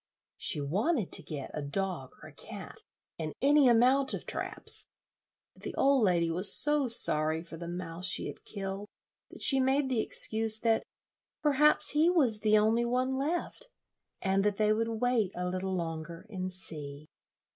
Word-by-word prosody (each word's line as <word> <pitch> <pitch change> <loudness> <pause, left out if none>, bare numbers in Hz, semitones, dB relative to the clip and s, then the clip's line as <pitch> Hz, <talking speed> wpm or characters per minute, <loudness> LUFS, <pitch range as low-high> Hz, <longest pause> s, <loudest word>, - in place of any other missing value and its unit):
She - - -1
wanted 200 - -1
to - - 0
get 145 -4 -8
a 150 - -4
dog 155 -2 -4
or - - -11
a - - -19
cat, - - -9 0.4
and 155 -2 -5
any 285 0 +4
amount 255 +3 +3
of - - -9
traps; - - -3 0.7
but - - -21
the - - -6
old 275 -3 +2
lady 170 -4 +1
was 185 +4 +6
so 295 -2 +5
sorry 160 -8 +3
for 170 - -11
the 170 +1 -8
mouse 175 0 -6
she - - -1
had - - -9
killed 195 0 -6 0.4
that - - -7
she 270 -2 +5
made 265 +1 +1
the 245 -4 0
excuse 220 0 +2
that 225 -1 +1 0.6
perhaps 300 0 +3
he 310 +3 +3
was 265 -12 +4
the 215 0 +3
only 220 +3 +2
one 250 +2 -1
left, 320 - -3 0.6
and 195 0 +1
that 205 -1 0
they 215 0 +2
would 225 +1 -2
wait 240 -6 0
a 180 0 -3
little 185 +1 -3
longer 165 0 -6
and 185 -2 -5
see. 150 -5 -8
210 Hz, 170 wpm, -29 LUFS, 175-255 Hz, 0.7 s, was